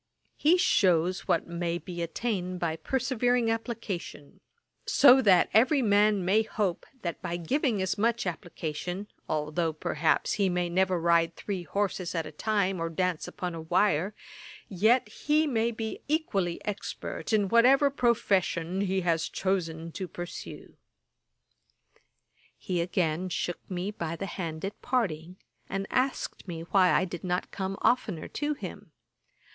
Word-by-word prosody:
He 325 Hz, +5 st, +4 dB
shews 180 Hz, -, +2 dB
what 165 Hz, -, +2 dB
may 170 Hz, 0 st, -2 dB
be 175 Hz, -1 st, -7 dB
attained 180 Hz, 0 st, -2 dB
by 165 Hz, -2 st, -1 dB
persevering 245 Hz, 0 st, +1 dB
application; 215 Hz, -, -5 dB, 0.5 s
so 270 Hz, -2 st, +7 dB
that 190 Hz, -7 st, +5 dB
every 255 Hz, +6 st, +4 dB
man 205 Hz, -2 st, +3 dB
may 205 Hz, +4 st, +4 dB
hope, 210 Hz, -5 st, -2 dB, 0.2 s
that 170 Hz, -2 st, -4 dB
by 170 Hz, -, -3 dB
giving 220 Hz, -, 0 dB
as 190 Hz, +2 st, -2 dB
much 230 Hz, +1 st, +1 dB
application, 175 Hz, +2 st, -4 dB, 0.2 s
although 155 Hz, +2 st, 0 dB
perhaps 155 Hz, 0 st, 0 dB
he 200 Hz, -3 st, +2 dB
may 175 Hz, -1 st, 0 dB
never 185 Hz, 0 st, +2 dB
ride 170 Hz, 0 st, +3 dB
three 195 Hz, -3 st, -4 dB
horses 185 Hz, +1 st, -2 dB
at 165 Hz, -1 st, -1 dB
a 150 Hz, -, -7 dB
time, 195 Hz, +2 st, 0 dB
or 165 Hz, -, -1 dB
dance 180 Hz, 0 st, -1 dB
upon 180 Hz, -3 st, -5 dB
a 165 Hz, -, -6 dB
wire, 180 Hz, +3 st, +1 dB, 0.5 s
yet 220 Hz, +5 st, +3 dB
he 300 Hz, +8 st, +1 dB
may 230 Hz, -5 st, +1 dB
be 225 Hz, -1 st, -5 dB
equally 200 Hz, -, 0 dB
expert 210 Hz, +2 st, -5 dB
in 210 Hz, -2 st, +3 dB
whatever 260 Hz, +6 st, +5 dB
profession 195 Hz, -8 st, +1 dB
he 190 Hz, -1 st, 0 dB
has 165 Hz, -2 st, 0 dB
chosen 165 Hz, -4 st, -2 dB
to 185 Hz, +2 st, -5 dB
pursue.' 175 Hz, +1 st, -8 dB, 1.8 s
He 180 Hz, -4 st, -2 dB
again 175 Hz, 0 st, -1 dB
shook 175 Hz, 0 st, -4 dB
me 185 Hz, +2 st, -3 dB
by 165 Hz, -5 st, -4 dB
the 195 Hz, -, -4 dB
hand 170 Hz, -3 st, -5 dB
at 200 Hz, -, -6 dB
parting, 180 Hz, -8 st, -1 dB, 0.3 s
and 195 Hz, 0 st, -2 dB
asked 255 Hz, -5 st, -1 dB
me 165 Hz, -2 st, -5 dB
why 185 Hz, +2 st, +3 dB
I 185 Hz, -, +3 dB
did 175 Hz, -2 st, -7 dB
not 180 Hz, 0 st, -2 dB
come 195 Hz, 0 st, -3 dB
oftener 205 Hz, -10 st, +1 dB
to 295 Hz, +1 st, -2 dB
him. -, -, -9 dB
185 Hz, 145 wpm, -28 LUFS, 170-220 Hz, 1.8 s, so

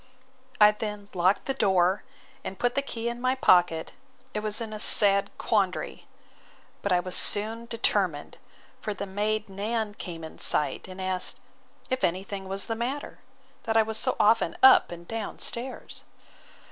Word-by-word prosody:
I 210 Hz, 0 st, +8 dB
then 210 Hz, -1 st, -6 dB
locked 185 Hz, +2 st, +1 dB
the 270 Hz, -, -1 dB
door, 190 Hz, -4 st, +2 dB, 0.4 s
and 190 Hz, -, -6 dB
put 245 Hz, +3 st, 0 dB
the 280 Hz, -, 0 dB
key 235 Hz, -4 st, -5 dB
in 235 Hz, 0 st, -4 dB
my 255 Hz, +1 st, +1 dB
pocket, 175 Hz, -, +3 dB, 0.4 s
and 210 Hz, -, -3 dB
was 215 Hz, +1 st, 0 dB
in 225 Hz, -2 st, -5 dB
a 215 Hz, -, -6 dB
sad 200 Hz, -2 st, +5 dB
quandary; -, -, -1 dB, 0.7 s
but 200 Hz, -, -2 dB
I 180 Hz, -, +4 dB
was 185 Hz, 0 st, -3 dB
soon 225 Hz, +3 st, +2 dB
determined; 195 Hz, -9 st, -1 dB, 0.4 s
for 210 Hz, -, -4 dB
the 200 Hz, -, -5 dB
maid 210 Hz, +2 st, -2 dB
Nan 210 Hz, +2 st, -3 dB
came 170 Hz, -5 st, -8 dB
in 160 Hz, -, -10 dB
sight, 150 Hz, -, +1 dB
and 185 Hz, 0 st, -10 dB
asked, 185 Hz, -1 st, -2 dB, 0.5 s
if 260 Hz, -, -1 dB
any 180 Hz, +2 st, +1 dB
thing 195 Hz, -1 st, -7 dB
was 195 Hz, +1 st, +2 dB
the 225 Hz, -, -2 dB
matter, 245 Hz, +6 st, -5 dB, 0.5 s
that 225 Hz, -1 st, +1 dB
I 225 Hz, -, +6 dB
was 220 Hz, 0 st, -3 dB
so -, -, +1 dB
often 220 Hz, +2 st, +3 dB
up 265 Hz, -, +7 dB
and 170 Hz, 0 st, -10 dB
down 225 Hz, -2 st, -5 dB
stairs? 250 Hz, +2 st, -4 dB
210 Hz, 170 wpm, -27 LUFS, 190-225 Hz, 0.7 s, I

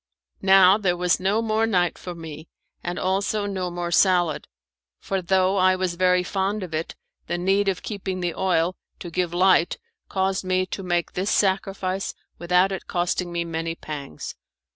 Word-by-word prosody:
Now 190 Hz, +1 st, +6 dB
there 180 Hz, -4 st, +1 dB
was 180 Hz, 0 st, +2 dB
no 200 Hz, +5 st, +1 dB
more 220 Hz, 0 st, +1 dB
night 180 Hz, -6 st, +1 dB
for 180 Hz, -1 st, -8 dB
me, 160 Hz, -1 st, -9 dB, 0.4 s
and 175 Hz, +1 st, -3 dB
also 200 Hz, +2 st, 0 dB
no 190 Hz, -3 st, -2 dB
more 175 Hz, 0 st, -4 dB
salad, 175 Hz, -4 st, +3 dB, 0.5 s
for 195 Hz, -1 st, -2 dB
though 190 Hz, +2 st, +2 dB
I 185 Hz, 0 st, +4 dB
was 185 Hz, -1 st, -1 dB
very 180 Hz, +1 st, +3 dB
fond 195 Hz, +2 st, -1 dB
of 175 Hz, -3 st, -7 dB
it 160 Hz, +1 st, -3 dB, 0.3 s
the 175 Hz, -, -1 dB
need 195 Hz, +3 st, +1 dB
of 190 Hz, -2 st, -1 dB
keeping 190 Hz, -3 st, -4 dB
the 175 Hz, -2 st, -1 dB
oil 180 Hz, -1 st, +1 dB, 0.2 s
to 175 Hz, -, -8 dB
give 175 Hz, 0 st, -1 dB
light 180 Hz, -1 st, +3 dB, 0.3 s
caused 190 Hz, 0 st, 0 dB
me 185 Hz, 0 st, +1 dB
to 190 Hz, -, -6 dB
make 175 Hz, -2 st, -1 dB
this 190 Hz, +3 st, -1 dB
sacrifice 195 Hz, -1 st, 0 dB, 0.2 s
without 180 Hz, +2 st, +3 dB
it 190 Hz, -, -5 dB
costing 175 Hz, 0 st, -1 dB
me 170 Hz, 0 st, -2 dB
many 165 Hz, 0 st, -3 dB
pangs. 145 Hz, -, -7 dB
185 Hz, 170 wpm, -24 LUFS, 175-195 Hz, 0.5 s, Now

